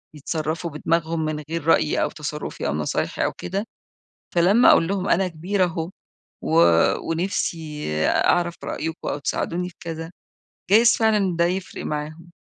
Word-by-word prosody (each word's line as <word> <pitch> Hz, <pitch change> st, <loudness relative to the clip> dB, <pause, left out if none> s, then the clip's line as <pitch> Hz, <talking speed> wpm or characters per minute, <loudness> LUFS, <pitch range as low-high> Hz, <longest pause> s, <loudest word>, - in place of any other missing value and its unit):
يتصرفوا 160 Hz, +3 st, -3 dB
بدماغهم 165 Hz, +1 st, -1 dB
من 150 Hz, -1 st, -3 dB
غير 165 Hz, -2 st, -3 dB
رأيي 160 Hz, -2 st, +3 dB
أو -, -, 0 dB
تصرفي 150 Hz, -, -5 dB
أو 70 Hz, -, 0 dB
نصايحي 75 Hz, 0 st, -1 dB
أو -, -, -1 dB
كده، 195 Hz, +3 st, -4 dB, 0.7 s
فلما 195 Hz, +8 st, +6 dB
أقول 165 Hz, -, +4 dB
لهم 195 Hz, 0 st, -1 dB
أنا 190 Hz, +1 st, +3 dB
كبيرة 180 Hz, +4 st, -1 dB
أهو، 165 Hz, -1 st, -3 dB, 0.5 s
و -, -, +1 dB, 0.5 s
ونفسي 165 Hz, -3 st, -2 dB, 0.2 s
أعرف 175 Hz, -1 st, +2 dB
رأيكم 160 Hz, +1 st, -4 dB
أو -, -, -2 dB
تساعدوني 175 Hz, +5 st, -2 dB
في 180 Hz, -, -20 dB
كذا، 165 Hz, 0 st, -6 dB, 0.6 s
جايز 230 Hz, +3 st, +6 dB
فعلًا 210 Hz, -6 st, +2 dB
ده 170 Hz, -, +4 dB
يفرق 185 Hz, +2 st, -4 dB
معاهم. 155 Hz, +3 st, -5 dB
165 Hz, 145 wpm, -23 LUFS, 155-180 Hz, 0.7 s, فلما